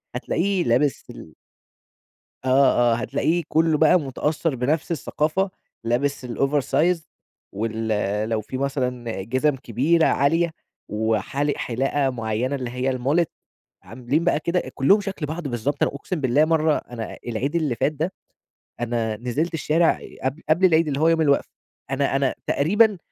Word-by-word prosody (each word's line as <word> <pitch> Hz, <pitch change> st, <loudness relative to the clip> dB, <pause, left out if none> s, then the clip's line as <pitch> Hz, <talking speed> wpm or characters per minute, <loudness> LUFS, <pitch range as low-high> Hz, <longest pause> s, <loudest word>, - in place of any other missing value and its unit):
هتلاقيه 190 Hz, 0 st, 0 dB
لابس 130 Hz, +4 st, +1 dB
ال -, -, -11 dB, 1.1 s
آه، 130 Hz, -3 st, +4 dB
آه -, -, +2 dB
هتلاقيه 155 Hz, +8 st, 0 dB
كُلُّه 160 Hz, -1 st, +2 dB
بقى 160 Hz, +3 st, +5 dB
متأثر 150 Hz, +2 st, -1 dB
بنفس 145 Hz, +7 st, -1 dB
الثقافة 165 Hz, +4 st, 0 dB, 0.3 s
لابس 125 Hz, +3 st, -1 dB
الOver 140 Hz, +4 st, 0 dB
Size 170 Hz, +2 st, +3 dB, 0.5 s
وال 110 Hz, +2 st, -3 dB, 0.4 s
لو 110 Hz, -1 st, 0 dB
في 130 Hz, +5 st, -6 dB
مثلًا 125 Hz, -6 st, -2 dB
جزم 130 Hz, +6 st, +1 dB
كبيرة 140 Hz, +7 st, +1 dB
عالية، 165 Hz, +4 st, +2 dB, 0.4 s
وحالق 110 Hz, +7 st, -1 dB
حلاقة 135 Hz, +3 st, 0 dB
مُعينة 120 Hz, +2 st, -2 dB
اللي 125 Hz, -3 st, -4 dB
هي 125 Hz, +2 st, -1 dB
الMullet 145 Hz, +7 st, +2 dB, 0.6 s
عاملين 130 Hz, +7 st, -2 dB
بقى 170 Hz, -4 st, +2 dB
كده 170 Hz, +3 st, 0 dB, 0.4 s
شكل 195 Hz, -6 st, -4 dB
بعض 155 Hz, 0 st, -4 dB
بالضبط، 130 Hz, +4 st, -1 dB
أنا -, -, +1 dB
أقسم 155 Hz, +2 st, -4 dB
بالله 135 Hz, +4 st, +3 dB
مرة 155 Hz, -1 st, +2 dB
أنا 115 Hz, -2 st, -7 dB
العيد 130 Hz, +8 st, -2 dB
اللي 150 Hz, -8 st, 0 dB
فات 150 Hz, -, +1 dB
ده، 160 Hz, +5 st, -3 dB, 0.7 s
أنا 115 Hz, -2 st, -1 dB
نزلت 140 Hz, +9 st, -2 dB
الشارع 160 Hz, +2 st, +2 dB, 0.2 s
قبل 135 Hz, +5 st, -2 dB
قبل 175 Hz, +4 st, +4 dB
العيد 165 Hz, -2 st, +4 dB
اللي 140 Hz, -1 st, -1 dB
هو 160 Hz, -, +4 dB
يوم 165 Hz, -1 st, +3 dB
الوقفة، 140 Hz, -2 st, +2 dB, 0.4 s
أنا 135 Hz, 0 st, 0 dB
أنا 135 Hz, -1 st, +1 dB
تقريبًا 205 Hz, +7 st, +3 dB
140 Hz, 145 wpm, -23 LUFS, 125-160 Hz, 1.1 s, بقى